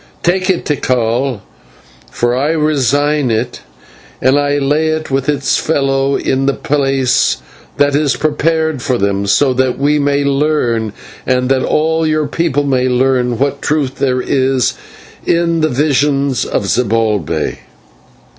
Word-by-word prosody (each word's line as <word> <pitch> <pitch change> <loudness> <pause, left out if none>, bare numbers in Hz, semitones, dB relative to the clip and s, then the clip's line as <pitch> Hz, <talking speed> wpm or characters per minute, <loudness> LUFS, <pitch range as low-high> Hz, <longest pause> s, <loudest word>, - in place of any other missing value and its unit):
"Take 185 +2 +1
it, 185 - 0
Tikal, 125 -3 -1 0.7
for 120 - -1
I 145 +5 0
resign 145 -2 +1
it, 115 +2 -2 0.6
and 130 +2 +3
lay 145 +2 +1
it 155 -2 -2
with 135 +1 0
its 140 -2 +1
fellow 135 -2 0
in 135 +1 0
the 140 - +1
place 135 -3 +1 0.4
that 145 0 +2
is 145 -2 +1
prepared 160 -1 0
for 130 0 0
them, 100 -1 -1
so 130 +6 +3
that 130 0 0
we 145 +2 +1
may 145 0 +1
learn, 135 -7 0 0.3
and 125 0 +1
all 160 +4 +1
your 155 -1 +1
people 145 -2 0
may 130 -2 +1
learn, 125 -1 +1
what 140 +1 -1
truth 140 -3 -1
there 130 -2 +1
is 130 -2 +1 0.5
in 170 -1 +1
the 155 - +2
visions 140 -1 +1
of - - -2
Zibalbay." 110 -6 0
140 Hz, 135 wpm, -14 LUFS, 125-150 Hz, 0.7 s, and